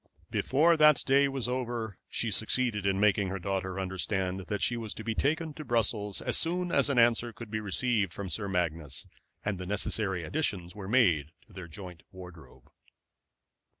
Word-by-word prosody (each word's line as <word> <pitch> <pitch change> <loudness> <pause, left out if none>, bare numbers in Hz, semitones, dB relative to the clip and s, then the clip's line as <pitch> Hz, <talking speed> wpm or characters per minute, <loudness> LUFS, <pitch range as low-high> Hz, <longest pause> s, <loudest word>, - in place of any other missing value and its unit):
Before 160 +5 +3
that 150 -3 +6
day 140 +1 +4
was 135 -3 -2
over 120 -5 -3
she 115 - 0
succeeded 110 -2 +1
in 95 0 +1
making 100 -1 +3
her 95 +1 -3
daughter 95 0 -3
understand 95 0 -2
that 105 - -2
she 120 - +1
was 115 -3 -5
to 110 - -6
be 110 0 -1
taken 155 +5 0
to 155 - -8
Brussels 110 -5 0
as - - +3
soon 175 +1 +1
as - - +3
an 140 - 0
answer 120 0 +4
could 115 -1 -10
be 110 - -1
received 105 -1 +1
from 100 +2 -6
Sir 100 +2 -2
Magnus 80 -7 -2 0.4
and 100 -2 -2
the 90 - -6
necessary 95 -2 -1
additions 95 - -2
were 100 -2 -7
made 85 - +3
to 110 - -21
their 90 -2 -8
joint 90 0 -10
wardrobe. 90 -3 -13
105 Hz, 180 wpm, -29 LUFS, 95-120 Hz, 0.4 s, that